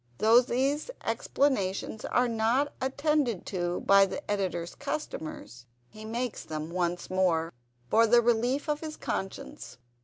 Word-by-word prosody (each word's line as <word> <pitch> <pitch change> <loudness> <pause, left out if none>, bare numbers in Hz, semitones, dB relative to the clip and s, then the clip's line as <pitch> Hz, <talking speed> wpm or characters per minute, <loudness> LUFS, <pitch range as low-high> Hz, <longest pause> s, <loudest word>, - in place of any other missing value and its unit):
Though 225 - +6
these 270 - -1
explanations 220 -6 -1
are 250 0 +2
not 235 +5 +1
attended 270 - 0
to 175 -2 -2
by 195 0 +6
the 280 +1 -5
Editor's 180 -4 -2
customers, 160 - -6 0.2
he 215 0 -11
makes 235 +1 -3
them 155 +1 -5
once 175 0 -2
more, 170 -3 +1 0.3
for 225 - +4
the 240 +2 +6
relief 240 +5 +1
of 300 -1 0
his 310 -1 -6
conscience. 190 -9 -5
220 Hz, 130 wpm, -29 LUFS, 185-265 Hz, 0.3 s, Though